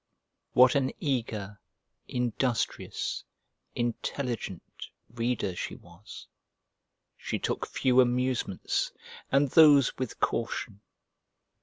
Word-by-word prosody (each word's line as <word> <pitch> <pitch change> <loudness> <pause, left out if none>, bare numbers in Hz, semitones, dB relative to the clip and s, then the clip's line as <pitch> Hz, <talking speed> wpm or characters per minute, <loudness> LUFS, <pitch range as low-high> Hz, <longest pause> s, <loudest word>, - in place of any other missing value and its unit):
What 125 0 +7
an 135 -2 +2
eager, 110 -7 -2 0.5
industrious, 125 -1 -2 0.5
intelligent, 120 -4 -3 0.5
reader 115 -6 -1
she - - -4
was! 90 +4 -13 0.9
She - - -3
took - - -2
few 130 0 +3
amusements, 125 -4 0 0.4
and 135 -1 +3
those 145 -5 +7
with 130 -3 -4
caution. 110 -2 -2
125 Hz, 85 wpm, -29 LUFS, 110-130 Hz, 0.9 s, What